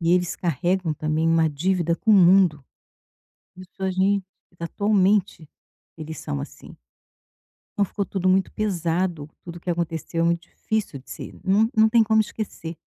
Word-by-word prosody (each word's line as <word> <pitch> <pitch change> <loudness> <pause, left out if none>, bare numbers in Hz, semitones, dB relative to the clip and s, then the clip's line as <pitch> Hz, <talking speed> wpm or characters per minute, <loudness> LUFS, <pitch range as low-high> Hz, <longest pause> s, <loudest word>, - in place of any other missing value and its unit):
E 170 +1 +2
eles 180 -1 +1
carregam 175 0 -1
também 155 +2 0
uma 165 -1 +3
dívida 170 +3 0
com 220 - -1
o 215 - +8
mundo. 180 -6 +5 0.9
Pessoas 185 0 -5
em 200 +1 +2 0.4
atualmente 195 -2 +1 0.5
eles 160 -2 -7
são 70 -1 -4
assim. - - -10 1.0
Então 205 - +3
ficou 200 +1 -3
tudo 190 0 -2
muito 190 +1 +2
pesado, 175 -5 -2
tudo 175 0 -9
que 180 - -7
aconteceu 165 -1 -2
é - - +3
muito 170 +1 -1
difícil 215 -9 -3
de 130 - -14
ser. - - -8
Não 200 +4 +3
não 220 0 +6
tem 230 0 +4
como 220 0 +3
esquecer. 210 -6 -4
180 Hz, 155 wpm, -23 LUFS, 165-195 Hz, 1.0 s, o